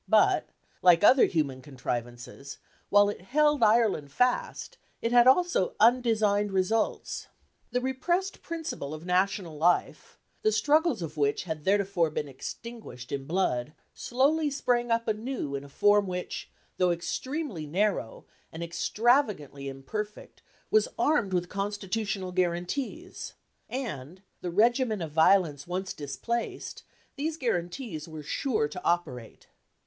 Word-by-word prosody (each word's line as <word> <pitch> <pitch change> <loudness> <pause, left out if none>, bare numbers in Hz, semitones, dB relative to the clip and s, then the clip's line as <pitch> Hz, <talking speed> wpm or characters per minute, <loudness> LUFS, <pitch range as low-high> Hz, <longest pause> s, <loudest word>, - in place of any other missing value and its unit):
But, - - +4 0.3
like 175 -1 +6
other 255 +5 +7
human 140 -6 -1
contrivances, 125 0 -6 0.3
while 205 0 +6
it 205 - -4
held 295 +7 +2
Ireland 215 -10 +3
fast, 250 - 0 0.2
it 230 - -1
had 240 0 +6
also 350 - +3
undesigned 220 -4 +3
results. 195 +4 -1 0.4
The 250 - -1
repressed 345 +9 -1
principle 320 - -5
of 155 +2 -10
national 180 -3 0
life, 175 +3 +1 0.2
the 435 - +3
struggles 300 - +2
of 155 -1 -7
which 145 -1 +1
had 160 -4 -5
theretofore 195 -4 +2
been 150 -1 -3
extinguished 140 - -8
in 135 -1 -4
blood, 150 -6 0 0.2
slowly 290 +5 +1
sprang 245 -4 0
up 230 0 +1
anew 220 - -2
in 140 0 -3
a 140 - -12
form 205 +5 +3
which, 180 -1 -5 0.3
though 180 -1 +3
extremely 200 - -3
narrow, 190 - -1 0.3
and 165 +1 -6
extravagantly 185 - +1
imperfect, 210 +11 -6 0.3
was 435 0 +4
armed 290 -11 +2
with 180 -1 0
constitutional 200 0 -3
guarantees; 185 - -3 0.4
and, 185 - -5 0.2
the 180 - -3
regimen 225 +3 +2
of 165 -3 -5
violence 160 -3 +3
once 185 +2 -3
displaced, 150 - -4 0.4
these 310 +3 -2
guarantees 175 - -3
were 155 -2 -8
sure 220 - 0
to 180 +4 -8
operate. 130 -10 -2
195 Hz, 125 wpm, -28 LUFS, 160-240 Hz, 0.4 s, other